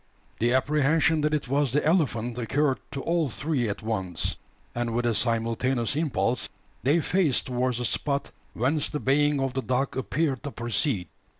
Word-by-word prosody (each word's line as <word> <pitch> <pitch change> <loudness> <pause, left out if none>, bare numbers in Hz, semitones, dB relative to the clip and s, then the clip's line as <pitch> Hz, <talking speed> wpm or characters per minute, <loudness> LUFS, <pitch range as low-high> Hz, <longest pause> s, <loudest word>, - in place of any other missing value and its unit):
The 120 +2 +2
apprehension 150 +4 +3
that 150 0 +1
it 145 - -3
was 140 0 +1
the 150 +4 +1
elephant 125 -9 +1
occurred 135 +4 +1
to 140 - -3
all 165 -3 +1
three 135 -2 -1
at 100 - -4
once; 95 -6 -2 0.4
and 120 -1 -2
with 120 0 +1
a 120 - +2
simultaneous 115 +2 0
impulse 135 -5 0 0.3
they 145 +6 +3
faced 170 -6 +1
towards 125 -1 0
the 125 - -2
spot 140 +3 -1 0.2
whence 140 +6 +1
the 150 - -3
baying 145 +1 +2
of 135 -1 -1
the 130 - -1
dog 130 +1 -1
appeared 130 +3 -1
to 145 - -5
proceed. 120 - -1
130 Hz, 170 wpm, -26 LUFS, 120-150 Hz, 0.4 s, apprehension